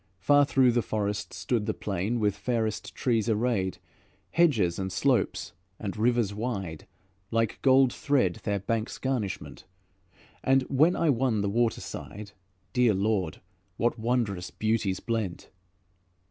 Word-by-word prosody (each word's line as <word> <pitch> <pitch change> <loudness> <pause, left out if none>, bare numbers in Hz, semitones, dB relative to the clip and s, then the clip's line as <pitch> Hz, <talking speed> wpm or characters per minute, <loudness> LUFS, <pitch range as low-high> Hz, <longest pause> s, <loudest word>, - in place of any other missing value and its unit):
Far 145 +9 +4
through 130 -3 +4
the 120 0 +2
forest 105 -1 -2
stood 105 +4 -2
The - - -1
plain 100 +4 -2
with 105 -2 +1
fairest 110 +1 -2
trees 115 -3 +1
arrayed, 110 -4 0 0.5
Hedges 115 - +3
and 95 0 -3
slopes 125 +6 0 0.2
and 100 -2 -5
rivers 115 -2 +1
wide, 100 -8 -4 0.4
Like 115 -1 0
gold 130 -1 +5
thread 125 -12 +1
their 100 -1 0
banks' 110 +3 -2
garnishment; 125 -8 -3 0.8
And 135 0 +4
when 155 +7 +3
I 165 -3 +3
won 120 -4 +1
the 100 - 0
waterside, 110 -2 -2 0.4
Dear 125 -4 +4
Lord! 95 -4 -1 0.4
what 120 0 0
wondrous 110 -6 -1
beauties 110 -2 0
blent! 110 -6 -3
110 Hz, 130 wpm, -28 LUFS, 100-125 Hz, 0.8 s, gold